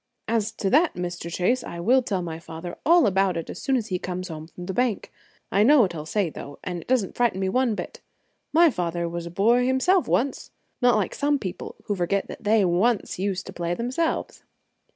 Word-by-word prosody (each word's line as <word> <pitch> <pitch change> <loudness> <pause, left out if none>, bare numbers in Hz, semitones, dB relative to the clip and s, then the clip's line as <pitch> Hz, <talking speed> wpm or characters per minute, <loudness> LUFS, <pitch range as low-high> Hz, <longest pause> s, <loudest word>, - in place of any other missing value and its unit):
"As 225 -1 0
to 195 -3 -2
that, 310 +5 +4
Mr. 175 -1 -5
Chase, 235 +9 +1
I 170 -6 -7
will 250 +9 +4
tell 195 -7 -2
my 165 -1 -5
father 165 +1 -8
all 340 -2 +6
about 195 -2 +2
it 165 - -5
as - - -8
soon 270 -2 +1
as 225 -3 -4
he 180 -1 -1
comes 185 +1 -5
home 160 -1 -7
from 175 +1 -10
the 190 - -4
bank. 240 0 -1 0.4
I 200 - +3
know 275 +5 +6
what 190 -5 +2
he 170 - -7
will 150 - -7
say, 190 -1 0
though, 140 -1 -9
and 175 -2 -4
it - - -17
doesn't 245 -7 +1
frighten 235 -6 +1
me 190 -1 0
one 250 0 +1
bit. - - -7 0.5
My 330 +1 +6
father 175 -4 -2
was 170 0 -5
a - - -6
boy 225 +8 +3
himself 330 +9 +2
once, 270 +2 0 0.3
not 245 -2 +5
like 205 -5 0
some 290 0 +1
people 190 -7 -6
who 205 - -2
forget 195 +2 0
that - - -9
they 210 -1 +4
once 190 +4 +1
used 190 -1 -2
to 190 - -9
play 175 0 -2
themselves." 255 - -2
195 Hz, 225 wpm, -25 LUFS, 175-245 Hz, 0.5 s, all